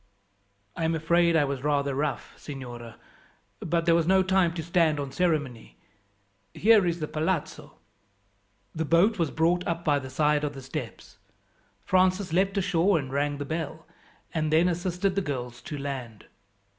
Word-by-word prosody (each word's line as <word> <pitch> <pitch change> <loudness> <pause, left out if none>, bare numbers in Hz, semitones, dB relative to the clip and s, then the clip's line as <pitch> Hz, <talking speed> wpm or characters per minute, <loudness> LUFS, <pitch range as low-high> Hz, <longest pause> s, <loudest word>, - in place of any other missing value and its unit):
"I 165 - -3
am 165 0 +1
afraid 170 +1 +2
I 155 - +4
was 140 -2 -3
rather 140 -1 +1
rough, 145 +1 -3
signora, 120 -5 -9 0.6
but 165 0 -1
there 170 - +4
was 165 -1 +2
no 190 0 +4
time 185 -2 +2
to 165 - -4
stand 165 -3 +2
on 140 -1 -4
ceremony. 135 - -2 0.8
Here 215 -4 +5
is 170 0 -1
the 155 - -3
palazzo." 155 +2 -3 1.0
The 160 - -2
boat 175 +7 +3
was 165 -3 +1
brought 175 +4 +1
up 170 0 -2
by 145 -2 +3
the 130 -1 -8
side 150 +2 +1
of 145 -1 -3
the 135 - -9
steps. 135 - -7 0.7
Francis 185 -1 +2
leapt 195 +3 +1
ashore 185 -1 +2
and 135 -4 -4
rang 145 +1 0
the 145 - -4
bell, 160 +1 -5 0.5
and 155 -2 -1
then 160 +3 +4
assisted 180 +2 -1
the 200 - 0
girls 125 -6 -5
to 145 +4 -6
land. 130 -6 -6
160 Hz, 165 wpm, -27 LUFS, 140-175 Hz, 1.0 s, Here